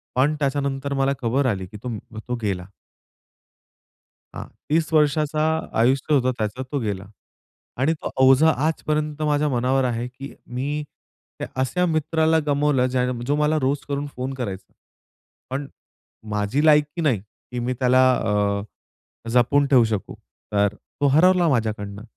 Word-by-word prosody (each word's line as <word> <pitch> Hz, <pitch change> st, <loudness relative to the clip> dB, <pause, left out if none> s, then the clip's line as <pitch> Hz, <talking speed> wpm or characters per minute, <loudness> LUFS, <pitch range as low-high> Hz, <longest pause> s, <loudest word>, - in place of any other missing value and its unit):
पण 140 Hz, +4 st, +3 dB
त्याच्यानंतर 140 Hz, -1 st, -1 dB
मला 135 Hz, 0 st, +1 dB
खबर 130 Hz, +4 st, +1 dB
आली 95 Hz, -2 st, -4 dB
की 105 Hz, -, -11 dB
तो 120 Hz, -4 st, -4 dB, 0.3 s
तो 125 Hz, -, 0 dB
गेला. 95 Hz, -4 st, -2 dB, 1.7 s
हां. -, -, -6 dB, 0.2 s
30 160 Hz, +1 st, +1 dB
वर्षाचा 150 Hz, 0 st, +2 dB, 0.4 s
आयुष्य 135 Hz, +5 st, +2 dB
होतं 130 Hz, -2 st, +3 dB
त्याचं. 110 Hz, +4 st, -2 dB
तो 145 Hz, -, 0 dB
गेला. 100 Hz, -4 st, -3 dB, 0.7 s
आणि 135 Hz, +6 st, +2 dB
तो 155 Hz, -, -6 dB, 0.2 s
ओझं 135 Hz, +4 st, +6 dB
आजपर्यंत 155 Hz, 0 st, 0 dB
माझ्या 150 Hz, 0 st, +1 dB
मनावर 130 Hz, +1 st, +1 dB
आहे 120 Hz, -1 st, -1 dB
की 135 Hz, +2 st, -10 dB, 0.2 s
मी 145 Hz, +4 st, -2 dB, 0.6 s
त्या -, -, -4 dB
अशा 180 Hz, +8 st, +1 dB
मित्राला 160 Hz, 0 st, +2 dB
गमावलं 145 Hz, -3 st, +2 dB
ज्या 125 Hz, 0 st, 0 dB, 0.2 s
जो 145 Hz, -, +1 dB
मला 150 Hz, +1 st, +2 dB
रोज 140 Hz, +2 st, +1 dB
करून 140 Hz, 0 st, -2 dB
फोन 130 Hz, +2 st, -3 dB
करायचा. 100 Hz, -7 st, -6 dB, 0.8 s
पण 140 Hz, +2 st, -3 dB, 0.7 s
माझी 105 Hz, +8 st, 0 dB
लायकी 150 Hz, +2 st, +3 dB
नाही 135 Hz, -9 st, +2 dB
की 115 Hz, +4 st, -11 dB
मी 125 Hz, +2 st, -1 dB
त्याला 130 Hz, 0 st, +4 dB
अ, 100 Hz, -1 st, 0 dB, 0.7 s
जपून 125 Hz, +4 st, +3 dB
ठेवू 130 Hz, -4 st, +5 dB
शकू, 105 Hz, -3 st, -3 dB, 0.4 s
तर 100 Hz, 0 st, +2 dB
तो 145 Hz, -, -4 dB
हरवला 180 Hz, +1 st, +5 dB
माझ्याकडनं. 105 Hz, -5 st, -2 dB
135 Hz, 140 wpm, -23 LUFS, 120-150 Hz, 1.7 s, ओझं